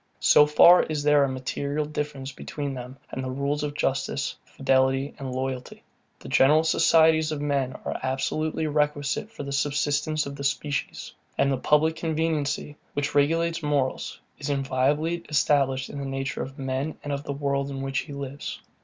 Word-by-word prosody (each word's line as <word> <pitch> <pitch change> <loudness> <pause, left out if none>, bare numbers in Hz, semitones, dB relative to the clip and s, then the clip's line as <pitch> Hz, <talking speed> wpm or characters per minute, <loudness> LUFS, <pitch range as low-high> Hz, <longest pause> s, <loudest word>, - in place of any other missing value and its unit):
So 150 - +6
far 170 +4 +7
is 150 -2 -2
there 145 -1 +5
a 140 - +1
material 140 +3 -2
difference 145 -2 -4
between 140 +1 -5
them 125 +1 -8
and 130 - -4
the 130 - -3
rules 140 +3 -1
of 145 -1 -3
justice, 135 -1 -1
fidelity, 135 +1 +1
and 135 -2 -5
loyalty. 130 0 -4 0.3
The - - -12
general 150 +4 +5
societies 160 -1 +4
of 155 - -3
men 140 -3 0
are - - -3
absolutely 155 +4 -1
requisite 150 +3 0
for 225 - -8
the 140 - -5
subsistence 150 +2 0
of 140 0 -6
the 140 - -6
species; 145 +1 -2 0.2
and 140 - +3
the 135 - +1
public 155 +4 +2
conveniency, 155 -3 -1 0.2
which 145 0 -1
regulates 165 +4 +2
morals, 145 -3 -1 0.2
is - - -4
inviolably 145 +5 0
established 135 -3 +2
in 145 - -7
the 140 - -4
nature 135 0 -3
of 135 +1 -7
man, 135 +3 -3
and 145 - -3
of 140 0 -3
the 145 - -4
world, 140 0 -1
in 135 -1 -5
which 135 +1 -1
he 145 - -7
lives. 140 0 -6
145 Hz, 170 wpm, -26 LUFS, 135-150 Hz, 0.3 s, far